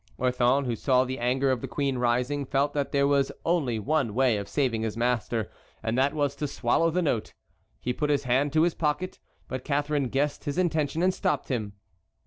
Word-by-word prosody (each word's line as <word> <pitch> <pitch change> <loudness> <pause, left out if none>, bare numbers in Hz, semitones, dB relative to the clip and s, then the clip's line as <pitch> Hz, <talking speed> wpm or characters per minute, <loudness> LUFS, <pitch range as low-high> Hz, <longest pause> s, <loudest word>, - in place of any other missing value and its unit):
Orthon, 125 +2 +2
who 120 -2 -1
saw 130 +2 +3
the 130 +1 -4
anger 130 +3 +1
of 130 - -1
the 135 - -4
queen 135 +1 -1
rising, 125 +4 +1
felt 140 +1 0
that 145 -2 -1
there 140 0 +3
was 140 -1 +2
only 155 -9 +1
one 130 -1 0
way 125 -4 +3
of 100 -1 -5
saving 125 -6 0
his 110 0 -3
master, 120 -3 0 0.3
and 110 +1 -1
that 135 +3 +2
was 145 -2 0
to 150 - -2
swallow 140 +5 +1
the 180 +2 0
note. 120 -8 -1 0.4
He 125 - -2
put 150 +3 -1
his 145 -1 +2
hand 135 +3 +1
to 160 0 +4
his 170 -1 +2
pocket, 160 +4 -2 0.3
but 130 -1 -5
Catharine 145 -2 0
guessed 140 +2 -1
his 145 +3 -3
intention 160 -3 0
and 185 0 +3
stopped 145 -6 -1
him. 110 -5 -2
135 Hz, 205 wpm, -27 LUFS, 125-145 Hz, 0.4 s, to